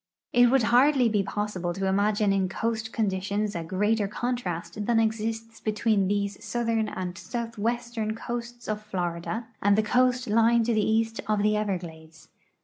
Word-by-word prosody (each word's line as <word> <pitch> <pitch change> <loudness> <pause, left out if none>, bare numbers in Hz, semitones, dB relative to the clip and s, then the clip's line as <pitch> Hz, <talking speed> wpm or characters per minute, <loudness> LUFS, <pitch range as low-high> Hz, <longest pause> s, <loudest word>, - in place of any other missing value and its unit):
It 245 0 +6
would 265 -1 +3
hardly 260 -1 +5
be 210 -2 +2
possible 190 -3 -3
to 195 - -2
imagine 205 +1 +2
in 190 -1 +1
coast 225 +3 -2
conditions 205 -1 -1
a 170 - -2
greater 205 +5 +1
contrast 205 -5 -3
than 235 -1 +3
exists 225 +1 -2
between 215 -2 +1
these 200 0 -2
southern 230 -2 0
and 180 -1 -5
south 230 +6 -5
western 230 -1 -2
coasts 240 0 -6
of 215 0 -2
Florida 185 +2 -3 0.2
and 200 +1 +4
the 215 - +3
coast 250 +3 +2
l}dng 230 +2 +4
to 235 - +1
the 215 -1 +2
east 225 0 +1
of 210 -1 +1
the 210 0 +3
Everglades. 165 -6 -5
215 Hz, 160 wpm, -27 LUFS, 195-230 Hz, 0.2 s, It